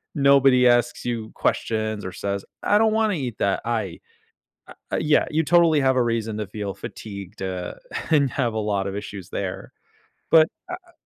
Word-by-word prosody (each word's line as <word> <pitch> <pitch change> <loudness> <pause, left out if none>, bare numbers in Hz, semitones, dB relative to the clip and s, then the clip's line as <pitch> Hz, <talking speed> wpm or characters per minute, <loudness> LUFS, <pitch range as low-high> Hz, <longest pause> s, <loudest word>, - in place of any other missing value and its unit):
nobody 135 -3 +5
asks 120 0 +2
you 115 -2 -3
questions 110 -2 -1
or 95 - -4
says, 100 +2 -3 0.2
"I 205 - +4
don't 220 0 +3
wanna 220 -1 +2
eat 125 -8 -4
that. 100 -1 +1
I" 110 -7 -2 0.7
uh, - - -12 0.2
uh, - - +1
yeah, 150 0 +3
you 160 +1 +1
totally 165 -2 +4
have 130 -1 +2
a 125 - +4
reason 115 -2 -1
to 105 - -3
feel 100 -1 -5
fatigued, 100 -1 -9
uh, 90 -2 -4 0.4
and 145 -4 +3
have 120 -4 -1
a - - -1
lot 105 -2 -1
of 100 - -5
issues 100 -3 -7
there. - - -5 0.6
But, 160 -1 +7 0.2
uh - - -2
uh - - -21
115 Hz, 185 wpm, -23 LUFS, 100-140 Hz, 0.7 s, But